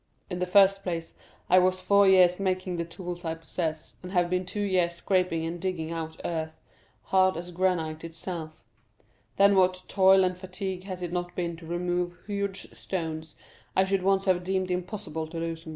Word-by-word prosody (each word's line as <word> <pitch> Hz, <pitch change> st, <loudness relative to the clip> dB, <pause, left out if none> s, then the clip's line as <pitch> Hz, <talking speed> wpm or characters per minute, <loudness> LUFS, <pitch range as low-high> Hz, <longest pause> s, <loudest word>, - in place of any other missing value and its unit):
In 180 Hz, -, -3 dB
the 180 Hz, -, -1 dB
first 195 Hz, +1 st, +5 dB
place, 170 Hz, -3 st, -4 dB, 0.3 s
I 185 Hz, -, +6 dB
was 185 Hz, 0 st, +2 dB
four 200 Hz, +1 st, +4 dB
years 185 Hz, -1 st, +6 dB
making 185 Hz, -2 st, -1 dB
the 170 Hz, -, -2 dB
tools 175 Hz, +1 st, -7 dB
I 165 Hz, -1 st, -2 dB
possess, 160 Hz, -1 st, -4 dB
and 180 Hz, -, -8 dB
have 175 Hz, -1 st, +2 dB
been 180 Hz, 0 st, 0 dB
two 205 Hz, +3 st, -3 dB
years 180 Hz, -3 st, +1 dB
scraping 180 Hz, -2 st, 0 dB
and 170 Hz, +1 st, -5 dB
digging 175 Hz, -4 st, -2 dB
out 160 Hz, -1 st, -5 dB
earth, 160 Hz, -1 st, -3 dB, 0.4 s
hard 185 Hz, -2 st, +3 dB
as 175 Hz, +1 st, -6 dB
granite 170 Hz, -3 st, 0 dB
itself; 165 Hz, -3 st, -6 dB, 0.7 s
then 200 Hz, 0 st, +6 dB
what 185 Hz, -1 st, +3 dB
toil 190 Hz, -1 st, +5 dB
and 185 Hz, 0 st, +1 dB
fatigue 185 Hz, 0 st, -5 dB
has 185 Hz, -2 st, -6 dB
it 175 Hz, -, -3 dB
not 175 Hz, 0 st, -3 dB
been 170 Hz, -2 st, -2 dB
to 165 Hz, -1 st, -12 dB
remove 175 Hz, +1 st, -1 dB
huge 200 Hz, -2 st, -3 dB
stones 160 Hz, -3 st, -5 dB, 0.4 s
I 190 Hz, -, +5 dB
should 195 Hz, 0 st, 0 dB
once 195 Hz, +1 st, +2 dB
have 180 Hz, -2 st, +2 dB
deemed 185 Hz, 0 st, -1 dB
impossible 180 Hz, -3 st, -4 dB
to 165 Hz, +1 st, -8 dB
loosen. 165 Hz, 0 st, -4 dB
180 Hz, 185 wpm, -27 LUFS, 165-190 Hz, 0.7 s, I